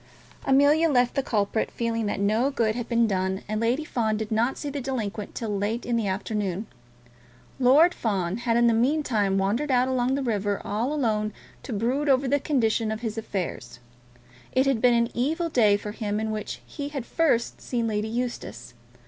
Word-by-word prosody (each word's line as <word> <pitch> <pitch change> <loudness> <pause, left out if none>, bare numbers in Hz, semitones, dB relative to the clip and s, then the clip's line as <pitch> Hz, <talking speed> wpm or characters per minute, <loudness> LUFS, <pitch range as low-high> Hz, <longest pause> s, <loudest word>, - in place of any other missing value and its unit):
Amelia 290 +4 +5
left 245 -3 +3
the 275 - +1
culprit, 215 -3 0
feeling 230 -2 -2
that 205 - -2
no 215 +6 +2
good 230 -6 0
had 240 0 -5
been 235 -1 +3
done, 190 -2 -1
and 215 +1 -2
Lady 245 +6 +1
Fawn 220 -6 0
did 220 0 -4
not 230 +4 +1
see 290 - -4
the 285 0 -4
delinquent 225 -6 -4
till 215 -3 -3
late 210 +4 -2
in 240 - 0
the 225 -3 0
afternoon. 200 0 -2 0.9
Lord 285 +8 +6
Fawn 195 -4 -1
had, 235 -1 0
in 240 - +4
the 235 - +4
meantime, 230 -6 +1
wandered 210 +10 0
out 255 -1 +3
along 260 0 +1
the 275 - -2
river 205 -4 -1
all 225 +7 -1
alone 215 -7 0 0.3
to - - -8
brood 250 +7 0
over 270 0 +3
the 285 +2 +2
condition 230 -6 +1
of 220 +1 -4
his 220 -3 -3
affairs. 190 - -4 0.8
It 260 +1 +3
had 270 -5 +1
been 245 -1 +5
an 235 0 +1
evil 320 +7 0
day 215 -8 +4
for 210 0 -6
him 210 -1 -3
in 220 0 -2
which 215 -1 -5
he 285 -1 -6
had 275 -5 -5
first 280 -8 0
seen 235 -2 -2
Lady 215 -1 -1
Eustace. 240 - -4
230 Hz, 190 wpm, -26 LUFS, 210-260 Hz, 0.9 s, Lord